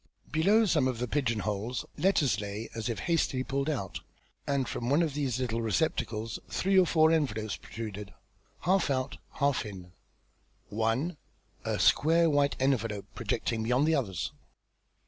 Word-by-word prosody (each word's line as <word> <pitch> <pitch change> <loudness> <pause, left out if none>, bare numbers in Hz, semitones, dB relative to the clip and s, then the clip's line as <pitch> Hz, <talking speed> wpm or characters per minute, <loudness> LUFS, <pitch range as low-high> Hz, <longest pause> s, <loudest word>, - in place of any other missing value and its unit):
Below 200 +9 +4
some 155 -9 +3
of 130 -2 -1
the 125 +2 -2
pigeon 115 -4 0
holes, 110 +4 -3
letters 145 - +2
lay 105 +2 -5
as 115 0 -3
if 115 - -2
hastily 155 -6 +1
pulled 140 +2 -1
out, 115 -11 -3 0.5
and 140 -2 +1
from 120 - -3
one 150 +5 +4
of 155 -4 -1
these 135 -4 -1
little 115 -2 -1
receptacles 115 -1 -1
three 195 +1 +1
or 180 - +4
four 160 0 +4
envelopes 110 -10 0
protruded, 105 -3 -7 0.5
half 185 0 +2
out, 130 0 -1
half 140 -2 +1
in 95 -5 -9 0.8
one, 115 - 0 0.5
a - - -1
square 165 +1 +4
white 145 -1 +2
envelope, 115 -6 0
projecting 115 -1 -2
beyond 125 +6 +2
the 160 - +3
others. 105 - -1
130 Hz, 150 wpm, -30 LUFS, 110-155 Hz, 0.8 s, Below